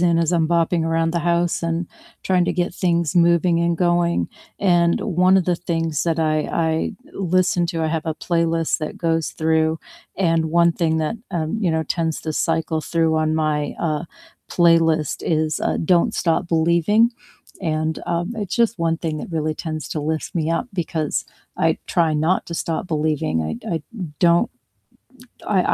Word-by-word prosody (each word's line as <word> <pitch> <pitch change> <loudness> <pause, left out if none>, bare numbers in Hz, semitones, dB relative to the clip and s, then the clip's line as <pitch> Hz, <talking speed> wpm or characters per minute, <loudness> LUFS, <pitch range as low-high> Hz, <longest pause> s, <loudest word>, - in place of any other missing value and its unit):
in 170 -1 +3
as 165 +1 +1
I'm 165 -2 +2
bopping 170 0 +2
around 165 0 +1
the 170 - 0
house, 170 +1 0
and 165 +1 -1 0.4
trying 180 -2 +2
to 175 - +1
get 175 0 -1
things 170 -4 0
moving 170 0 +3
and 170 0 +1
going, 175 0 +1 0.3
and 175 -3 +3
one 185 -1 +3
of 190 - +2
the 175 0 +1
things 165 -3 -2
that 165 -1 0
I 155 -1 +2
I 160 -1 0 0.2
listen 185 -1 +1
to 165 -1 -2
I 160 - +1
have 160 0 -2
a 160 - -1
playlist 165 -1 0
that 155 - -5
goes 165 -1 0
through, 160 0 +1 0.4
and 165 -3 +2
one 170 +1 +3
thing 160 -2 0
that, 155 +8 -1
um, 160 +4 -2
you 185 -5 +1
know, 160 0 0
tends 160 0 -2
to 160 - -3
cycle 160 0 0
through 165 0 +1
on 155 0 +1
my, 155 -2 0
uh, 155 0 -1 0.5
playlist 165 -3 +3
is, 155 -1 0
uh, - - 0
"Don't 170 +1 +3
Stop 170 +1 0
Believing," 170 +8 +3 0.5
and, 155 -2 -1
um, 175 +4 -1
it's 205 -4 -3
just 230 -2 +1
one 165 -1 +1
thing 160 -2 -3
that - - -7
really 155 -1 -1
tends 155 -1 -5
to 155 - -3
lift 155 +1 -3
me 165 -2 0
up, 165 +9 -1
because 160 -4 -2 0.3
I - - +1
try 165 -3 +1
not 160 +5 +1
to 170 - -5
stop 165 +2 -2
believing, 155 - 0
I 80 0 -3
d - - -11
I - - +1
d - - -17 0.4
don't 170 0 +4 1.0
I 200 -3 +2
165 Hz, 180 wpm, -21 LUFS, 160-175 Hz, 1.0 s, don't